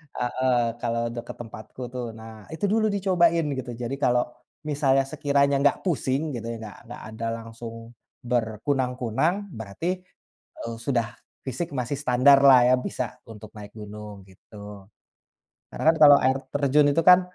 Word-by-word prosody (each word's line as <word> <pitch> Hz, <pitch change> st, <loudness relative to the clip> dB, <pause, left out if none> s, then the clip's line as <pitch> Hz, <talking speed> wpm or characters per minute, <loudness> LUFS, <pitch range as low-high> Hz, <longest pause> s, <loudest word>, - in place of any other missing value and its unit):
heeh 130 Hz, +1 st, 0 dB, 0.2 s
kalau 115 Hz, -1 st, -1 dB
dekat 120 Hz, -, -7 dB
tempatku, 110 Hz, +2 st, -10 dB
tuh, 125 Hz, -1 st, -4 dB
nah 110 Hz, -1 st, -12 dB
itu 160 Hz, -, -2 dB
dulu 220 Hz, 0 st, +2 dB
dicobain 175 Hz, -4 st, +3 dB, 0.2 s
gitu. 125 Hz, -1 st, -6 dB
Jadi 120 Hz, +3 st, -4 dB
kalau 125 Hz, 0 st, +3 dB, 0.5 s
misalnya 135 Hz, -2 st, +2 dB
sekiranya 140 Hz, 0 st, +2 dB
nggak 145 Hz, -, +4 dB
pusing 150 Hz, -3 st, -1 dB
gitu, 115 Hz, -3 st, -5 dB
nggak 110 Hz, -2 st, -7 dB
nggak 120 Hz, -, -9 dB
ada 110 Hz, +1 st, -6 dB, 0.2 s
langsung 115 Hz, 0 st, -10 dB, 0.3 s
berkunang-kunang 125 Hz, -, -1 dB
berarti, 110 Hz, -, -5 dB, 0.8 s
eee, 115 Hz, 0 st, -5 dB
sudah 120 Hz, -4 st, +1 dB, 0.4 s
fisik 135 Hz, +6 st, -3 dB
masih 125 Hz, +3 st, -2 dB
standarlah, 135 Hz, 0 st, +6 dB
ya, -, -, +6 dB
bisa 125 Hz, -, -2 dB, 0.3 s
untuk 110 Hz, -1 st, -11 dB
naik 105 Hz, -1 st, -10 dB
gunung 105 Hz, -1 st, -9 dB
gitu, 100 Hz, +1 st, -12 dB, 0.9 s
Karena, -, -, -5 dB
kan, -, -, -5 dB
kalau 145 Hz, -1 st, +9 dB
air 130 Hz, +1 st, +3 dB, 0.2 s
terjun 145 Hz, +1 st, +3 dB
itu, 165 Hz, -, +2 dB
kan, 180 Hz, +1 st, +8 dB
125 Hz, 140 wpm, -25 LUFS, 115-140 Hz, 0.9 s, kalau